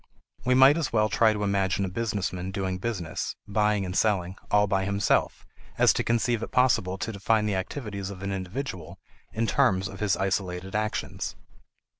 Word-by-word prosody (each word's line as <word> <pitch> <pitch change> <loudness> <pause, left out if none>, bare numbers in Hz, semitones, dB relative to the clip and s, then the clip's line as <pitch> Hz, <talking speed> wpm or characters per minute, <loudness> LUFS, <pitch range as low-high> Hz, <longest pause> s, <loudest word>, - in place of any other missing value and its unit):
We 125 0 +3
might 135 +4 +7
as 160 -3 -1
well 110 -1 +2
try 110 +3 +4
to 105 -1 -2
imagine 100 -1 +1
a - - -2
business 100 -1 -2
man 90 0 -4
doing 95 -1 -3
business, 90 -7 -3
buying 105 -1 +1
and 90 0 -5
selling, 95 -4 +1
all 105 0 +4
by 100 -1 0
himself, 100 +1 0 0.3
as - - +5
to - - -1
conceive 115 0 +1
it - - -4
possible 115 -7 +2
to 100 +4 -3
define 105 +1 +1
the 105 - 0
activities 100 0 -4
of 100 -1 -8
an 100 - -2
individual 95 - -5 0.3
in 115 +1 -1
terms 95 -2 +2
of 95 - -9
his 105 -3 +1
isolated 95 -1 -2
actions. 105 -3 -2
100 Hz, 180 wpm, -27 LUFS, 95-110 Hz, 0.3 s, might